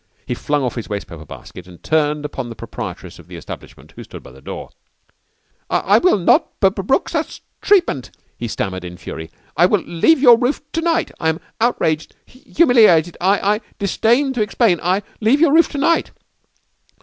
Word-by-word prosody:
He - - -3
flung 145 -1 -1
off 125 - -2
his 115 - -6
wastepaper 85 -6 -6
basket 90 +4 -12
and 90 -2 -16
turned 150 -1 0
upon 135 -4 -5
the 115 - -8
proprietress - - -8
of - - -15
the - - -11
establishment - - -11
who - - -9
stood - - -12
by - - -13
the 65 +1 -16
door. - - -8 1.0
"I 205 +4 +3
will 365 - +3
not 175 - +2
brook 195 - +1
such - - -4 0.2
treatment," 345 - +2 0.3
he 120 - -5
stammered 95 -4 -4
in 90 0 -8
fury. 80 -2 -8 0.3
"I 175 +3 +5
leave 205 - +2
your 240 -4 +7
roof 250 +3 0
to 330 - -2
night. 335 0 0
I 160 - +1
am 160 +1 -2 0.2
outraged 160 -10 0
humiliated. 230 - +3
I 195 +3 +3 0.2
I - - -13 0.2
disdain 235 +7 +1
to 245 - -2
explain. 210 -4 +2
I 185 +4 0 0.2
leave 230 +6 +3
your 315 -2 +4
roof 335 +1 +5
to - - -3
night." 335 +4 +1
185 Hz, 175 wpm, -19 LUFS, -, 1.0 s, your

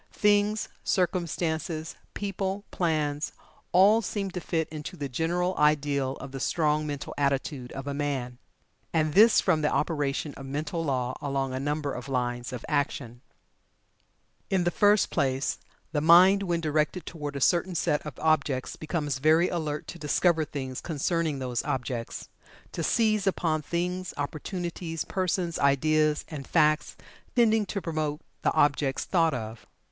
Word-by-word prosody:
Things, 210 0 +2 0.2
circumstances, 170 -2 -1 0.2
people, 195 0 -3
plans, 155 -4 -1 0.4
all 205 +5 +6
seem 200 -2 -3
to 180 - -5
fit 160 -2 -1
into 155 +4 -7
the 145 -2 -3
general 175 +7 0
ideal 145 -3 +2
of 135 - -9
the 135 - -6
strong 150 +1 +1
mental 145 -2 -5
attitude 140 -2 -1
of 135 - -6
a 140 - -3
man. 135 -4 -3 0.5
And 155 -2 +1
this 215 +3 +7
from 165 -5 +2
the 150 - +2
operation 145 -2 -1
of 135 - -9
mental 150 +4 -3
law 130 -4 -1
along 135 -2 -1
a 130 - -2
number 145 0 -2
of 125 +2 -7
lines 120 -1 -2
of 125 -2 -6
action. 125 -4 -2 1.3
In 190 -2 +2
the 175 - +1
first 205 +2 +4
place, 135 -3 0 0.3
the 150 - 0
mind 180 +5 +7
when 175 -3 -1
directed 155 +2 0
toward 150 -3 -6
a - - -2
certain 175 +5 +2
set 150 -2 +1
of 150 -5 -8
objects 155 -5 +1
becomes 150 -3 -2
very 160 +5 +4
alert 155 -3 -3
to 175 - -8
discover 160 +1 +2
things 130 -3 -5
concerning 160 -1 -1
those 125 -3 -2
objects 120 -2 -3 0.4
to - - -4
seize 215 +3 +2
upon 160 -4 +1
things, 180 +3 -3
opportunities, 165 +3 -4
persons, 180 -2 -1
ideas, 150 +2 +2
and 145 -4 -7
facts 155 -2 +2 0.4
tending 220 -3 +4
to 200 - -2
promote 155 -2 -2 0.2
the - - +2
objects 145 -3 +2
thought 165 -5 +2
of. 110 -1 -7
155 Hz, 150 wpm, -27 LUFS, 140-175 Hz, 1.3 s, this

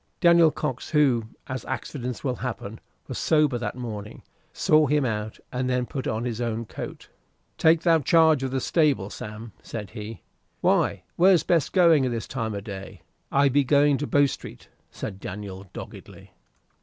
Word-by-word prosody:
Daniel 170 -2 +6
Cox, 130 -3 -4
who 135 -7 +3 0.2
as 130 -2 -5
accidents 125 -2 -5
will 125 -3 -1
happen 115 -3 -5 0.3
was - - -5
sober 150 -6 +2
that 120 - -3
morning, 110 -4 -7 0.3
saw 155 -1 +3
him 145 0 +2
out, 110 -2 -3
and 125 0 -1
then 125 -1 +1
put 130 +1 -5
on 110 +2 -2
his 120 -1 -3
own 115 -1 -2
coat. - - -8 0.5
"Take 160 0 +5
thou 165 -1 +4
charge 160 0 +4
of 135 - -1
the 130 0 -2
stable, 140 - +1
Sam," 110 +2 -8
said 105 -4 -7
he. 110 +1 -8 0.4
"Why, - - +2
where 185 +1 +6
be'st 165 -2 +1
going, 170 -6 +5
at - - -2
this 115 -2 -4
time 115 -5 -3
o' 100 - -4
day?" 95 -4 -9 0.3
"I 140 +1 +4
be 140 +1 +3
going 145 +1 +3
to 145 - -2
Bow 145 0 +4
Street," 140 - -7 0.2
said 95 -3 -7
Daniel 100 0 -7
doggedly. - - -11
125 Hz, 170 wpm, -25 LUFS, 110-150 Hz, 0.5 s, Daniel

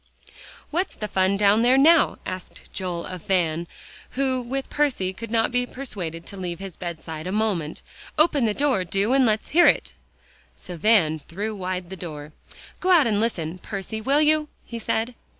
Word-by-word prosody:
"What's 355 +5 -1
the 210 - -4
fun 190 0 +2
down 205 +2 +4
there 250 +3 +5
now?" 320 +4 +5
asked 185 -1 -8
Joel 180 -3 -3
of 185 -2 -7
Van, 170 -3 +1 0.5
who 260 -2 +1
with 265 +3 -4
Percy 260 -11 0
could 230 +4 -8
not 225 +1 +1
be 245 0 0
persuaded 180 -12 -6
to 200 - -9
leave 175 -2 -4
his 195 -1 -6
bedside 165 -2 -6
a - - -2
moment, 195 -7 -1 0.3
"open 305 -5 +4
the 210 -2 0
door, 275 -9 +2
do, 195 +7 0
and 265 -2 +5
let's 215 0 0
hear 345 +3 +6
it." - - +2 0.6
So 180 - -9
Van 165 -4 +3
threw 205 +9 -5
wide 185 -2 -4
the - - -4
door. 150 -4 -8 0.5
"Go 370 - -1
out 345 -5 +6
and 210 -3 +2
listen, 180 -6 -2
Percy, 205 +3 -5
will 280 +6 +3
you?" 305 0 +3 0.2
he 235 - -6
said. 225 +2 -1
205 Hz, 180 wpm, -24 LUFS, 180-255 Hz, 0.6 s, hear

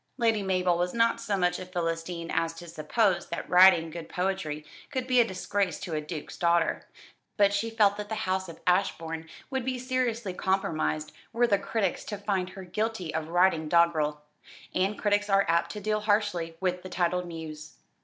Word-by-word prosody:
Lady 225 -4 +2
Mabel 185 -2 +1
was 180 +3 -1
not 230 0 +2
so 200 -2 -1
much 180 -1 +1
a 185 - -6
Philistine 170 -1 -3
as 165 0 0
to 175 +1 -10
suppose 175 +4 +1
that 170 - -5
writing 180 -2 +6
good 165 0 -7
poetry 180 -5 -2 0.2
could 260 -3 -2
be 255 -1 +3
a - - +6
disgrace 195 -3 -2
to 170 - -5
a 155 - -1
duke's 150 0 -7
daughter; 170 -1 +1 0.5
but 200 -1 +4
she 210 +3 0
felt 210 -3 +3
that 205 0 -6
the 220 - -2
house 190 -1 -1
of 165 - -10
Ashbourne 165 -3 0 0.2
would 265 -1 -1
be 255 0 -2
seriously 245 -5 -1
compromised 155 -5 -1 0.2
were 240 +1 +3
the 200 -4 +2
critics 200 -2 -1
to 205 - -4
find 195 -2 -1
her 190 0 -9
guilty 185 -2 -3
of 160 0 -2
writing 170 -2 +2
doggerel; 155 -3 +3 0.5
and 195 +3 +1
critics 205 0 +1
are 195 0 +4
apt 170 +1 +2
to 210 - -5
deal 215 +1 0
harshly 205 -6 0
with 180 -1 -1
the 185 - -8
titled 180 0 0
muse. 155 -2 -8
185 Hz, 185 wpm, -28 LUFS, 165-205 Hz, 0.5 s, writing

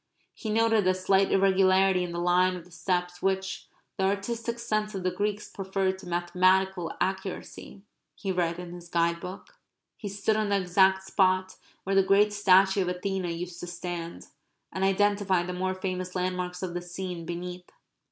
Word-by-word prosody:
He 220 - -6
noted 225 0 +3
the 185 0 +3
slight 190 +1 +2
irregularity 190 -1 +4
in 175 - -4
the 170 - -5
line 180 +1 +3
of 175 -2 -9
the 180 - -19
steps 180 +1 -2
which 190 0 -1 0.3
"the 190 - +1
artistic 230 +4 -2
sense 215 -2 -2
of 190 - -4
the 185 - +1
Greeks 205 +3 -2
preferred 190 -1 -2
to 180 - -11
mathematical 180 +1 +1
accuracy," 190 +1 -4 0.3
he 195 - -3
read 170 -2 0
in 175 -1 -7
his 175 -1 -11
guide 170 0 +1
book. 180 +3 -9 0.4
He 205 - -6
stood 205 +2 0
on 215 -1 0
the 200 -1 +2
exact 190 +1 +3
spot 185 -1 +1 0.3
where 195 - -2
the 195 - +7
great 200 +2 +3
statue 195 -1 +4
of 185 - -1
Athena 185 0 -2
used 170 +1 -5
to 175 - -6
stand, 175 -1 -6 0.5
and 190 - -3
identified 195 -2 +2
the 180 - -4
more 185 +1 -1
famous 185 -1 -4
landmarks 180 0 -2
of 180 -2 -3
the 175 - -3
scene 175 -1 -6
beneath. 180 +1 -6
185 Hz, 175 wpm, -28 LUFS, 180-195 Hz, 0.5 s, the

